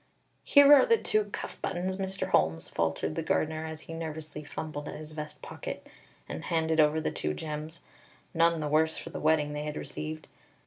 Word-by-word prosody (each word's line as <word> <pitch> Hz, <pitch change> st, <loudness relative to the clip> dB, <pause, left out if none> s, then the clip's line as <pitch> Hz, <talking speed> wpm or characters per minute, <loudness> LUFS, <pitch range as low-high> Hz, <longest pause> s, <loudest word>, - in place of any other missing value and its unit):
"Here 285 Hz, 0 st, +8 dB
are 290 Hz, -, +9 dB
the 460 Hz, -1 st, +5 dB
two 215 Hz, -, +1 dB
cuff 205 Hz, -, -7 dB
buttons, 185 Hz, +1 st, -2 dB
Mr. 190 Hz, -1 st, -3 dB
Holmes," 80 Hz, -, +2 dB
faltered 80 Hz, -1 st, -1 dB
the -, -, -2 dB
gardener, 155 Hz, 0 st, 0 dB
as 160 Hz, 0 st, -7 dB
he 165 Hz, -, -9 dB
nervously 155 Hz, -2 st, -5 dB
fumbled 150 Hz, 0 st, -5 dB
at -, -, -6 dB
his 155 Hz, 0 st, -8 dB
vest 150 Hz, -1 st, -7 dB
pocket -, -, -6 dB, 0.4 s
and -, -, -6 dB
handed 160 Hz, -1 st, +1 dB
over 155 Hz, +1 st, +5 dB
the 155 Hz, -, -1 dB
two 75 Hz, -, -2 dB
gems, 155 Hz, -, -6 dB, 0.5 s
none 165 Hz, -1 st, +3 dB
the 150 Hz, -, -1 dB
worse 160 Hz, +2 st, +2 dB
for -, -, -7 dB
the -, -, -5 dB
wetting 150 Hz, -1 st, +2 dB
they 150 Hz, -, -3 dB
had 150 Hz, 0 st, -4 dB
received. 155 Hz, 0 st, -6 dB
155 Hz, 190 wpm, -29 LUFS, 150-165 Hz, 0.5 s, are